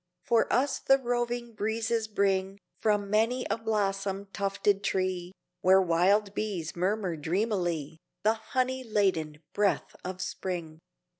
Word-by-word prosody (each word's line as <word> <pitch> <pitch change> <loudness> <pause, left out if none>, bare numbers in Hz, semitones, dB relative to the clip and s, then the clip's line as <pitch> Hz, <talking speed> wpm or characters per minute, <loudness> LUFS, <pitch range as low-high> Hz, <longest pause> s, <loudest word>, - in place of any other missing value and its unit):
For 230 -1 +2
us 270 +2 +2
the 270 - +5
roving 240 -2 -2
breezes 220 +1 -1
bring 195 -2 0 0.2
From 205 -2 +1
many 230 +4 +2
a - - +1
blossom 200 -3 -1
tufted 200 0 +1
tree 185 -2 -1 0.3
Where 190 +1 +6
wild 190 +4 +3
bees 190 -8 -3
murmur 185 0 0
dreamily 170 -2 -1 0.2
The 215 +1 +4
honey 255 +3 -1
laden 175 -9 0
breath 205 -1 +1
of 185 0 -5
Spring. 170 -5 -4
200 Hz, 125 wpm, -29 LUFS, 185-220 Hz, 0.3 s, Where